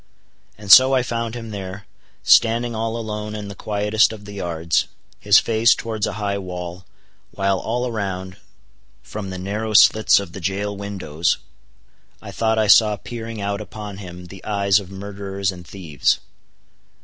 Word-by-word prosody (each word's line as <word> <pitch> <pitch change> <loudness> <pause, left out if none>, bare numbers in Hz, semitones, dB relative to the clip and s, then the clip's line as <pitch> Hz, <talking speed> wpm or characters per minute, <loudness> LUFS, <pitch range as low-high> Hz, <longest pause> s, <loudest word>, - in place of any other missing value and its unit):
And 100 -1 -3
so 130 +4 +9
I 130 - +2
found 115 -1 -3
him 115 -2 -7
there, 95 0 -7 0.4
standing 115 +1 +4
all 115 +1 -2
alone 105 -1 -5
in 105 -1 -6
the - - -7
quietest 105 +2 +1
of 105 -2 -10
the 105 - -9
yards, 85 -3 -1 0.3
his 100 0 +5
face 115 +1 +4
towards 110 -3 -3
a - - -4
high 100 -1 -2
wall, 90 -1 -7 0.4
while 95 -1 0
all 120 +2 -2
around, 95 -5 -4 0.7
from 100 - -6
the 95 - -6
narrow 105 +4 -3
slits 110 +1 +6
of 100 -4 -7
the 95 - -8
jail 100 +3 -2
windows, 95 -6 -2 0.8
I - - -9
thought 110 -1 0
I 110 - +3
saw 105 +1 +6
peering 115 +2 -7
out 100 +1 -2
upon 105 -1 -8
him 90 -2 -9
the 95 +1 -12
eyes 100 -1 +2
of 95 -3 -10
murderers 100 0 -4
and 90 -1 -12
thieves. 80 -8 -1
100 Hz, 160 wpm, -21 LUFS, 95-110 Hz, 0.8 s, so